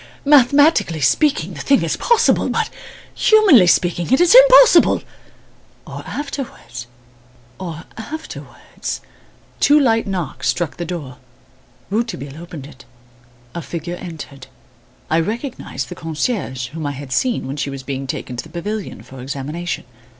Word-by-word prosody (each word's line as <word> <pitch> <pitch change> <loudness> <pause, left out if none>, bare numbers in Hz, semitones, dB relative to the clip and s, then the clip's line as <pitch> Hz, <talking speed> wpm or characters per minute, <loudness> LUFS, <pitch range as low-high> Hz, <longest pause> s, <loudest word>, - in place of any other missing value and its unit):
Mathematically 285 - +4
speaking 190 - +2
the - - -7
thing 275 -1 +3
is - - -1
possible; 470 -1 +2
but - - -1 0.4
humanly 400 - +6
speaking 175 +2 +1
it 265 - +5
is 350 +2 +5
impossible - - +7 0.8
or - - -8
afterwards 270 - -6 0.7
or 170 -3 -6
afterwards 315 +8 -7 0.3
" - - -32
Two 295 +1 +5
light 225 -6 +2
knocks 155 -9 -3
struck 140 +6 -2
the 175 - -4
door. 150 -8 -6 0.7
Rouletabille 165 - -3
opened 165 -5 -9
it. 135 -2 -14 0.7
A 170 - -4
figure 170 +1 -6
entered. 160 -7 -9 0.6
I 160 - +2
recognised 215 - -4
the - - -5
concierge, 155 - -3
whom 155 +1 -5
I 145 - -3
had 140 -1 -9
seen 240 - 0
when 135 +2 -5
she 140 - -2
was 135 -1 -7
being 135 0 -5
taken 125 -1 -5
to - - -4
the 160 - -14
pavilion 195 +5 -5
for 130 -1 -11
examination. 140 +6 -4
175 Hz, 140 wpm, -19 LUFS, -, 0.8 s, impossible